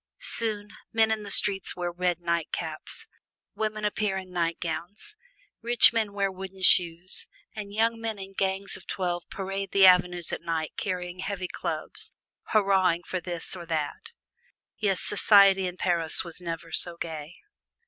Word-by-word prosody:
Soon, 220 - +3 0.2
men 220 0 +3
in 220 -1 0
the 205 - -8
streets 200 -1 +1
wear 175 -1 -3
red 175 0 -1
nightcaps, 170 -2 -2 0.5
women 215 -1 -2
appear 210 -1 0
in 185 -1 -7
nightgowns, 170 - -3 0.5
rich 235 0 +6
men 220 -3 0
wear 200 -1 -1
wooden 190 0 -9
shoes, 175 0 +4 0.3
and 205 -2 -6
young 225 +2 +1
men 225 -2 -3
in 195 0 -9
gangs 195 0 -1
of - - -12
twelve 175 -2 -3
parade 195 0 -4
the 195 -1 +7
avenues 180 -2 +4
at - - -3
night 160 -2 -3
carrying 180 -2 -4
heavy 190 -1 -3
clubs, - - -4 0.4
hurrahing 190 -5 +3
for 185 - -3
this 175 +1 -5
or 170 -2 -9
that. 155 -3 -3 0.7
Yes, 195 -3 0
society 195 -2 +5
in 180 0 -6
Paris 170 -3 +1
was 170 0 -7
never 165 -1 -6
so 175 -1 0
gay. 160 -1 -6
190 Hz, 150 wpm, -27 LUFS, 175-205 Hz, 0.7 s, the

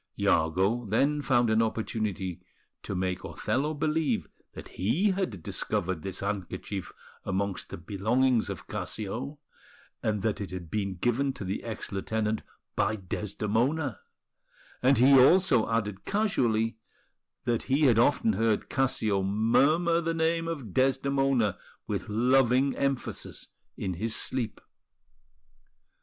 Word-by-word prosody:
Iago 95 +9 +2
then 140 +7 +2
found 120 -5 +2
an 110 +1 +4
opportunity 105 -5 -2 0.4
to 100 - -5
make 90 0 -2
Othello 150 +4 -1
believe 155 +1 0 0.3
that - - -9
he 165 - +1
had 185 - -3
discovered 90 0 -2
this 95 +1 -5
handkerchief 100 -1 -4 0.3
amongst 95 0 -2
the - - -6
belongings 110 +8 +1
of - - -6
Cassio, 115 +8 -4 0.6
and 105 -3 -1
that 110 -2 0
it 100 - -4
had 90 -3 -7
been 100 -3 -1
given 125 +8 0
to 100 - -7
the 95 +2 -3
ex 115 -2 -5
lieutenant 110 +2 -1 0.3
by 110 - +1
Desdemona; 110 - -1 0.8
and 130 +1 +4
he 135 +3 +7
also 145 - +5
added 105 -4 -1
casually 120 - +1 0.7
that 120 -2 +1
he 135 +3 +3
had 120 -5 +5
often 115 -3 +3
heard 110 +1 0
Cassio 110 -7 +1
murmur 140 - +3
the 165 0 -1
name 165 +1 +1
of 140 - -5
Desdemona 135 -4 +2 0.3
with - - -3
loving 125 +4 +3
emphasis 135 -2 -3 0.3
in 95 - -2
his 110 +6 -2
sleep. 120 -3 -2
115 Hz, 125 wpm, -28 LUFS, 100-135 Hz, 0.8 s, he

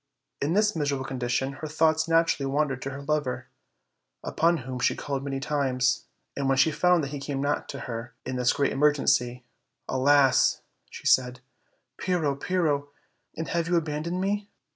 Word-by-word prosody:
In 150 +4 +1
this 210 +1 +2
miserable 140 -4 -1
condition 130 +1 -2
her 155 - -3
thoughts 160 +1 +2
naturally 165 -4 +2
wan 150 +1 +1
dered 130 -2 -5
to 135 - -3
her 140 +1 -7
lover, 145 -3 -2 0.7
upon 165 +2 +2
whom 130 -1 -5
she - - +2
called 140 -2 -4
many 135 -1 -3
times, 130 -3 0 0.3
and, 140 -1 -1
when 135 - +2
she 155 +4 +4
found 180 0 +3
that 140 - -4
he 145 - -4
came 135 0 -4
not 145 +1 -1
to - - -6
her 115 -1 -6
in 130 - -3
this 125 -1 +2
great 140 - +1
emergency, 135 -4 +2 0.4
"Alas!" 135 0 +3 0.3
she - - -11
said, 125 -1 +3 0.6
"Pyrrho, 170 -6 0
Pyrrho! 145 -2 0 0.5
and 160 - -4
have 170 -1 0
you 175 - +1
abandoned 165 +2 -1
me?" 200 +2 -1
145 Hz, 170 wpm, -26 LUFS, 135-160 Hz, 0.7 s, she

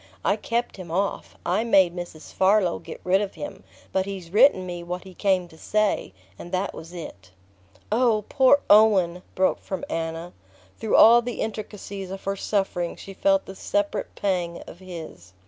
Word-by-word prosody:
I - - +3
kept 235 -1 -2
him 185 -3 -9
off 195 +4 -2
I 185 +6 +1
made 190 -6 +4
Mrs. 175 -3 -8
Farlow 190 -2 +3
get - - -9
rid 190 +2 +3
of 200 -2 -4
him. 290 - -7 0.3
But 190 0 0
he's 190 -4 -7
written 210 -3 +5
me 175 -1 -5
what 180 +1 -5
he 190 -1 -12
came 185 -1 +1
to 160 - -17
say; 215 - 0 0.3
and 175 - -9
that 190 +2 -1
was 165 +1 -10
it." 100 - -9 0.6
"Oh, 220 -2 +2
poor 275 +1 +5
Owen!" 195 -5 +5
broke 185 0 +2
from 190 -3 -5
Anna. 165 +1 -4 0.5
Through 220 - 0
all 235 +2 +8
the 245 0 -5
intricacies 205 -3 -5
of 195 +1 -7
her 195 0 -1
suffering 195 -4 -1
she 195 - -10
felt 195 0 +2
the 195 - -8
separate 205 +1 -2
pang 180 -4 -1
of 175 - -12
his. 165 - -10
190 Hz, 175 wpm, -25 LUFS, 175-210 Hz, 0.6 s, all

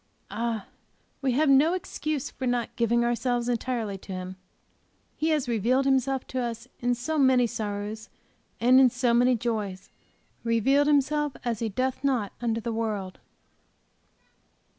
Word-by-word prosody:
Ah, 230 -3 -2 0.6
we 265 -2 +1
have 300 +5 +2
no 285 +6 +5
excuse 310 -5 -3
for 260 - -4
not 240 -1 -1
giving 235 0 +2
ourselves 240 0 0
entirely 230 -4 -2
to 195 - -11
Him. 185 0 -5 0.8
He 315 - 0
has 300 -4 +1
revealed 240 +4 +1
Himself 265 -1 +1
to 255 - -2
us 235 0 -4
in 245 0 +1
so 305 +6 -2
many 260 -2 +5
sorrows 210 -1 -4 0.5
and 250 +2 +6
in 260 -1 +7
so 245 0 +1
many 245 +1 +4
joys; 210 -5 -3 0.5
revealed 260 +5 +3
Himself 295 0 +2
as 230 -3 -1
He 230 - -1
doth 255 +6 -2
not 250 -8 0
unto 230 -1 0
the 230 +1 -3
world! 210 -4 -3
240 Hz, 145 wpm, -27 LUFS, 225-265 Hz, 0.8 s, in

